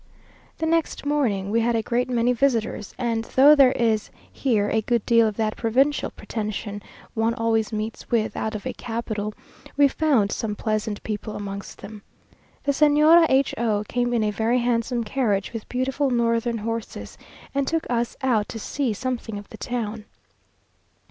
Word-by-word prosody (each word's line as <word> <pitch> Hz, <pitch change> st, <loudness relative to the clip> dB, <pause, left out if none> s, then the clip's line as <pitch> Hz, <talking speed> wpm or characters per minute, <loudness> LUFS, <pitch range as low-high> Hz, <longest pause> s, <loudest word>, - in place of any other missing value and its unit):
The 320 Hz, -, -2 dB
next 330 Hz, -2 st, 0 dB
morning 225 Hz, -10 st, 0 dB
we 230 Hz, -, +3 dB
had 235 Hz, +1 st, +1 dB
a 225 Hz, -, 0 dB
great 245 Hz, +3 st, 0 dB
many 245 Hz, 0 st, +2 dB
visitors, 235 Hz, -5 st, 0 dB
and 230 Hz, -3 st, -1 dB
though 275 Hz, +5 st, +6 dB
there 275 Hz, -3 st, +6 dB
is 225 Hz, -3 st, +1 dB, 0.2 s
here 220 Hz, -6 st, +1 dB
a 220 Hz, -, +1 dB
good 235 Hz, 0 st, 0 dB
deal 230 Hz, -2 st, +5 dB
of 215 Hz, -, -4 dB
that 215 Hz, -1 st, 0 dB
provincial 265 Hz, +6 st, +1 dB
pretension 210 Hz, -1 st, -5 dB, 0.3 s
one 225 Hz, +1 st, +1 dB
always 225 Hz, -1 st, 0 dB
meets 215 Hz, +1 st, -5 dB
with 225 Hz, -2 st, 0 dB
out 220 Hz, 0 st, -3 dB
of 205 Hz, -, -6 dB
a -, -, -2 dB
capital, 220 Hz, -3 st, -4 dB, 0.4 s
we 285 Hz, 0 st, +6 dB
found 270 Hz, -9 st, +2 dB
some 210 Hz, -2 st, -2 dB
pleasant 215 Hz, -1 st, -2 dB
people 215 Hz, 0 st, -4 dB
amongst 200 Hz, -1 st, -7 dB
them. 210 Hz, 0 st, -9 dB, 0.6 s
The 285 Hz, -, +2 dB
Señora 305 Hz, +3 st, +6 dB
H 270 Hz, +1 st, +3 dB
o 215 Hz, -3 st, +1 dB
came 245 Hz, -1 st, 0 dB
in 235 Hz, -2 st, +1 dB
a 210 Hz, -, +1 dB
very 225 Hz, +4 st, +1 dB
handsome 240 Hz, 0 st, 0 dB
carriage, 210 Hz, -4 st, -1 dB
with 225 Hz, -2 st, -7 dB
beautiful 265 Hz, +2 st, 0 dB
northern 235 Hz, -1 st, +1 dB
horses, 225 Hz, +1 st, -5 dB, 0.4 s
and 275 Hz, -1 st, 0 dB
took 325 Hz, 0 st, 0 dB
us 240 Hz, -1 st, -1 dB
out 225 Hz, -6 st, +1 dB
to -, -, -6 dB
see 250 Hz, +2 st, -2 dB
something 235 Hz, -1 st, -4 dB
of 205 Hz, 0 st, -10 dB
the -, -, -10 dB
town. 225 Hz, -3 st, -4 dB
230 Hz, 170 wpm, -24 LUFS, 215-255 Hz, 0.6 s, though